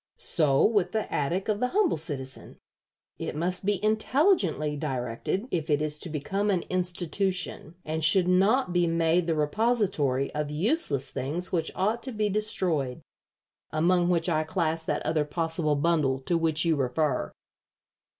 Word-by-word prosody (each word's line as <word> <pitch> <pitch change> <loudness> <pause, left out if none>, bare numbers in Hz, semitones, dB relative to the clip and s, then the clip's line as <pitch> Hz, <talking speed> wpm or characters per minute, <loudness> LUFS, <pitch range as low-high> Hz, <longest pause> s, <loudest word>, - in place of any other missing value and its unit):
So 145 -5 +3
with 205 -5 +1
the 220 -1 -2
attic 170 +7 -1
of 210 -1 0
the 250 - +1
humble 395 +5 +2
citizen. 145 -5 -5 0.6
It - - -4
must 180 +4 -1
be 205 -1 0
intelligently 215 - +2
directed 135 - -3
if 165 -3 -2
it 145 -1 +3
is 150 0 -3
to 175 - 0
become 195 +7 -2
an 185 -4 +1
institution, 180 -1 0
and 160 +1 -3
should 180 +3 +5
not 195 +4 +3
be 175 -1 +2
made 165 +1 +1
the 165 - +1
repository 150 - 0
of 150 -1 -2
useless 150 - 0
things 160 +8 -3
which 170 -3 0
ought 215 +5 0
to 260 - -5
be 215 -2 -1
destroyed, 180 - -1 0.7
among 175 +3 +2
which 175 -1 +1
I 155 -3 +1
class 165 -1 -1
that - - -2
other 155 -1 +1
possible 160 0 -1
bundle 145 -3 +1
to 170 +6 -1
which 165 -1 +1
you 165 -1 +3
refer." 135 +1 -1
170 Hz, 155 wpm, -27 LUFS, 150-195 Hz, 0.7 s, should